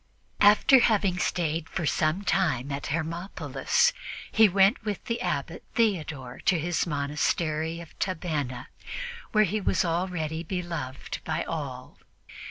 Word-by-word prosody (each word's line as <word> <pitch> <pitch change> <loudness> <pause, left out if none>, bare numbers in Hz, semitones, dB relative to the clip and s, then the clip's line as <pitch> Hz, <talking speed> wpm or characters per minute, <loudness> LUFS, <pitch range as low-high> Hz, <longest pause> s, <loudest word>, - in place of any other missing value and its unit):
After 210 +6 +7
having 200 -6 +2
stayed 160 -3 -1
for 170 - -2
some 155 +6 +1
time 145 -10 +1
at 140 0 -3
Hermopolis, 170 - 0 0.4
he 220 -2 +6
went 195 +4 +4
with 210 -3 -4
the 230 0 -2
Abbot 170 -1 -2
Theodore 155 - 0
to 185 - +4
his 175 +2 0
monastery 155 +2 -1
of 165 - -12
Tabenna, 155 -8 -2 0.7
where 215 -2 +5
he 210 +2 -1
was 185 - +1
already 165 -2 -1
beloved 170 -6 -4
by 160 +1 -1
all. 135 -6 -6
170 Hz, 125 wpm, -27 LUFS, 150-190 Hz, 0.7 s, After